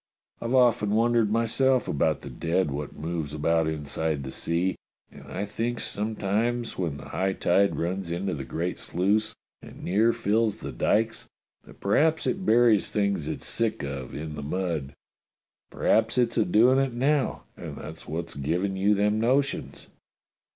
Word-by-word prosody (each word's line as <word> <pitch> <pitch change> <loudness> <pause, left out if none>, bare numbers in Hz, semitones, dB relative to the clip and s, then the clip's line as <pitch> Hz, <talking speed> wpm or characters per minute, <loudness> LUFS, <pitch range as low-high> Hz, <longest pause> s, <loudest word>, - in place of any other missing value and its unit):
I've 120 +3 0
often 115 -5 +4
wondered 115 -1 +3
myself 125 +3 +2
about 75 +1 +1
the - - -8
dead 85 -1 0
what 70 +1 -5
moves 80 -2 -4
about 80 +1 +2
inside 75 -1 -2
the 65 - -6
sea, 85 +6 0 0.4
and - - -13
I 100 - -2
thinks 115 +4 -3
some 110 +2 -3
times 115 +4 0
w^hen 80 -6 -3
the - - -10
high 95 +1 0
tide 100 +2 +2
runs 90 +1 -2
into 90 +3 -2
the 70 - -4
great 85 +6 -3
sluice 105 +5 0 0.3
and - - -12
near 105 +6 +3
fills 110 -1 +1
the - - -6
dykes 115 +2 0 0.4
that - - -16
perhaps 155 +11 +2
it 190 -1 -1
buries 115 -2 +4
things 100 -6 0
it's - - -4
sick 115 -1 -1
of 70 -2 -5
in 75 +1 -5
the 75 - -6
mud. 80 -2 -3 0.7
P'raps 115 +2 +1
it's 120 -2 +2
a 110 - +3
doin' 120 +8 +5
it 135 -2 0
now, 135 +3 +1
and - - -7
that's 80 +1 -9
wot's 80 +2 -4
given 85 +8 -1
you 100 +2 +3
them 105 +2 +2
notions." 135 +4 0
100 Hz, 165 wpm, -26 LUFS, 80-115 Hz, 0.7 s, doin